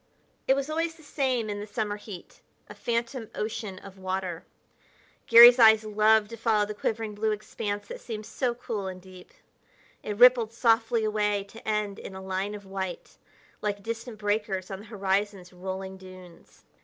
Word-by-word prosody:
It 265 - +5
was 275 0 -2
always 325 +1 -2
the 325 - -18
same 260 -6 -1
in 205 -1 -4
the 205 - -6
summer 210 -1 -3
heat 205 -4 -11 0.3
a - - -10
phantom 235 -1 -3
ocean 215 -2 -4
of 195 0 -12
water. 185 -2 -3 0.8
Garry's 240 +2 +10
eyes 220 -1 +7
loved 215 0 +3
to 230 - -7
follow 220 -2 +2
the 210 - -5
quivering 220 +1 -3
blue 215 +1 -1
expanse 205 -1 -4
that - - -8
seemed 215 -3 -6
so 245 0 -2
cool 220 -5 -4
and 185 -1 -6
deep. 185 0 -14 0.7
It 210 -1 -5
rippled 240 -2 +6
softly 230 -1 +2
away 210 -2 0
to 225 - -13
end 210 -2 -1
in 190 - -9
a - - -7
line 190 +2 -3
of 205 -1 -10
white, 190 -2 -6 0.4
like 205 -1 -2
distant 230 +1 -5
breakers 205 -2 -2
on 190 - -5
the 210 - -12
horizon's 195 -3 -2
rolling 190 +1 -6
dunes. 185 -2 -15
210 Hz, 170 wpm, -27 LUFS, 195-230 Hz, 0.8 s, Garry's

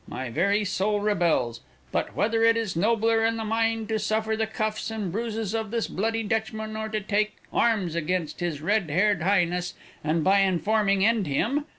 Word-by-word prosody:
My 130 -2 -5
very 200 - +1
soul 205 +2 0
rebels. 175 - +1 0.3
But - - -2
whether 225 +1 +1
it 230 0 +5
is 220 -6 -2
nobler 225 +4 +2
in 225 0 +1
the 225 - -3
mind 225 0 0
to 220 -1 0
suffer 220 +1 0
the 220 0 -1
cuffs 215 0 -2
and 215 -5 -3
bruises 225 0 -3
of 220 -2 -2
this 230 +1 -1
bloody 225 +3 -1
Dutchman 220 0 -2
or 220 0 -3
to 215 0 -2
take 210 +1 0 0.2
arms 205 -8 +1
against 170 -1 -2
his 165 -4 -3
red 200 -1 +1
haired 185 +3 +2
highness, 180 -1 +1 0.3
and 155 +1 0
by 195 +3 +4
informing 195 +1 +2
end 220 -5 +2
him? 250 - 0
210 Hz, 185 wpm, -26 LUFS, 180-225 Hz, 0.3 s, it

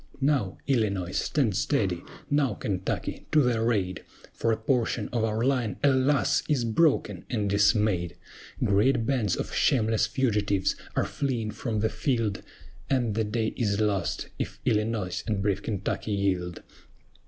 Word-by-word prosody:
Now, 135 -9 +1
ILLINOIS, 100 -9 0
stand 125 -10 +1
steady! - - 0 0.3
Now, 140 -6 +1
KENTUCKY, 95 -2 -3
to 150 -2 +6
their 120 -1 +2
aid! 95 -5 -1 0.3
For 115 - 0
a 110 - +1
portion 115 -1 0
of 115 -2 -1
our 110 +1 0
line, 125 -6 0
alas! 140 +1 +3
is 135 -6 +2
broken 115 - +2
and 105 -5 -1
dismayed: 100 -3 +2 0.5
Great 110 +4 +3
bands 120 -8 +1
of - - -4
shameless 110 -4 +2
fugitives 105 -7 +1 0.2
are - - +2
fleeing 120 -6 -2
from 110 0 -3
the 110 - +2
field, 110 -3 -1 0.5
And 120 -5 +1
the 110 +2 0
day 110 +1 -1
is 100 -4 0
lost, 100 -5 0
if - - -4
Illinois 105 -4 0
and 105 -3 0
brave 100 0 0
Kentucky 105 +1 -2
yield. 95 -3 -1
110 Hz, 140 wpm, -27 LUFS, 100-125 Hz, 0.5 s, to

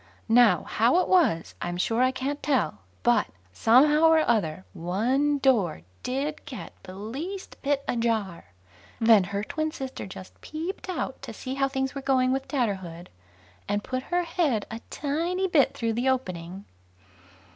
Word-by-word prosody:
Now, 235 0 +5
how 235 +9 +2
it - - +1
was, 320 - +2
I'm 175 0 -3
sure 225 +6 +1
I 255 - +5
can't 265 +3 -3
tell; 265 - 0 0.2
but 120 - +3 0.3
somehow 295 - +5
or 320 -1 +4
other 190 -6 0
one 235 - +1
door 225 - +2 0.2
did 275 +4 -3
get 260 - -8
the 185 - -10
least 285 - -6
bit 280 0 0
ajar, 225 -7 -1 0.5
then 225 -4 +6
her 200 +2 -3
twin 310 +7 -2
sister 265 -7 -6
just 185 0 -11
peeped 335 +5 -6
out 365 - -3
to - - -7
see 260 - -6
how 270 0 +1
things 265 -1 -2
were 275 - -5
going 260 -1 +2
with 270 0 -1
Tatterhood, 190 - -3 0.6
and 205 0 0
put 255 0 -3
her 355 0 +1
head 320 - 0
a 225 +1 -6
tiny 340 +6 -1
bit 310 -7 +3
through 230 -1 -1
the 245 +4 +1
opening. 185 -7 -3
255 Hz, 155 wpm, -26 LUFS, 205-290 Hz, 0.6 s, then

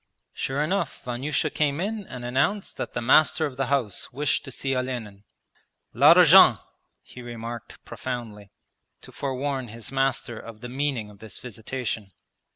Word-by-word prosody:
Sure 135 +3 -1
enough 190 +6 -2
Vanyusha 130 +3 -1
came 145 -1 0
in 205 +2 -3
and 125 -2 -7
announced 140 +12 0
that - - -4
the 120 - -2
master 155 +5 +4
of 140 -4 -5
the 135 0 -1
house 130 -6 -1
wished 145 +3 0
to 135 - -8
see 135 +1 -2
Olenin. 120 -6 -4 0.7
'L'arjan!' - - +8 0.5
he 125 - -12
remarked 120 -1 -7
profoundly, 115 -5 -6 0.5
to - - -12
forewarn 135 -1 -3
his 115 +1 -8
master 135 -3 0
of 115 -1 -11
the 120 - -7
meaning 130 -5 -2
of 100 - -17
this 110 -2 -9
visitation. 110 -3 -5
125 Hz, 150 wpm, -25 LUFS, 115-140 Hz, 0.7 s, L'arjan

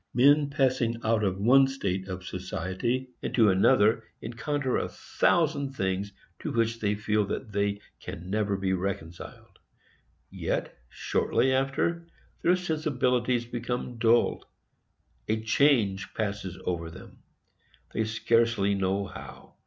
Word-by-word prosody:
Men 145 +3 +5
passing 130 -5 +1
out 110 -1 +2
of 95 -2 0
one 130 +7 +5
state 95 -8 -3
of 95 -1 -6
society 95 +8 -3
into 110 -4 +3
another 105 +4 +4 0.2
encounter 130 +3 -2
a - - -1
thousand 145 -5 +1
things 95 0 -1 0.3
to - - -4
which 115 0 0
they 105 -1 0
feel 105 0 +1
that 110 +2 -4
they 100 0 0 0.2
can 85 +3 -8
never 105 -1 0
be 95 -1 0
reconciled; 90 -3 -5 0.7
yet, - - -3
shortly 130 0 +1
after, 135 +6 0 0.3
their 175 +2 +4
sensibilities 125 -8 0
become 120 0 -4
dulled,—a 115 -1 -2
change 110 -5 +2
passes 100 -4 -3
over 85 -2 -2
them, - - -13 0.7
they 110 - +1
scarcely 115 -2 +2
know 95 0 0
how. - - -11
115 Hz, 120 wpm, -28 LUFS, 100-130 Hz, 0.7 s, Men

